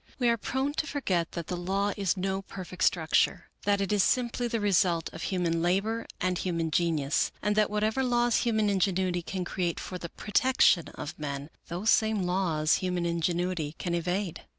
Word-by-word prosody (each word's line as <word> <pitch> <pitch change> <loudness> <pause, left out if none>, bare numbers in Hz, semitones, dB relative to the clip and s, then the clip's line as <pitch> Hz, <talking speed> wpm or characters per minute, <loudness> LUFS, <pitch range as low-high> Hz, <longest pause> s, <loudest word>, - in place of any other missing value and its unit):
We 245 -2 +2
are 235 - +2
prone 265 +5 -1
to 310 - 0
forget 185 - -1
that 170 -2 -4
the 180 - -3
law 195 +3 -1
is 195 -1 0
no 190 +1 -1
perfect 185 -2 -6
structure, 160 -3 +2
that 200 0 +2
it 195 +1 0
is 205 - +4
simply 245 +2 +1
the 230 -1 -1
result 180 -5 +2
of - - -8
human 170 -3 0
labor 200 +6 0
and 185 -1 0
human 165 -3 -1
genius, 155 -4 +1
and 210 0 0
that 215 -1 +3
whatever 215 +4 0
laws 240 -2 +2
human 220 -3 +1
ingenuity 185 -2 +1
can 180 +2 -4
create 175 -2 -2
for 180 - -6
the 170 - -6
protection 210 -5 +3
of 150 - -7
men, 140 0 -5 0.2
those 180 +6 +1
same 220 -3 +2
laws 175 -4 +1
human 180 -2 -1
ingenuity 170 -1 -1
can 175 - -3
evade. 175 +1 -2
185 Hz, 180 wpm, -28 LUFS, 170-210 Hz, 0.2 s, is